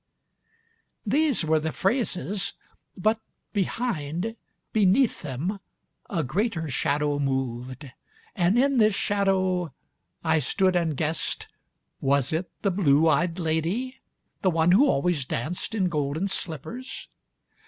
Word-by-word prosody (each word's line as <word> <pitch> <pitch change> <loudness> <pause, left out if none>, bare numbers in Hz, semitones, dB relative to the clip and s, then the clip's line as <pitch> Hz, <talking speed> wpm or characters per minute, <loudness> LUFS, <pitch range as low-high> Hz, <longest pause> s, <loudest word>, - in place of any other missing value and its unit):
.' 455 0 -40 0.3
These 275 - +2
were 155 0 +3
the 160 +1 -2
phrases; 195 - -1 0.4
but 215 +4 +2 0.3
behind, 200 -2 -2 0.4
beneath 215 +4 +3
them, 160 +8 -3 0.5
A 165 - 0
greater 170 - -1
shadow 145 +2 0
moved, 130 0 -3 0.4
and 180 +4 +3
in 270 0 +3
this 215 -2 +4
shadow 190 -5 +1 0.5
I 160 -1 +3
stood 185 +7 +1
and 165 -5 +1
guessed 160 +1 -2 0.5
Was 140 0 +1
it 170 +3 -1
the 200 - +2
blue 165 -4 +4
eyed 170 +2 +2
lady? 175 +10 -1 0.4
The 190 - +3
one 165 0 +3
who 245 +11 +6
always 165 - +1
danced 155 - -3
in 190 -4 +2
golden 150 +2 -1
slippers? 190 - -5
175 Hz, 120 wpm, -26 LUFS, 150-205 Hz, 0.5 s, who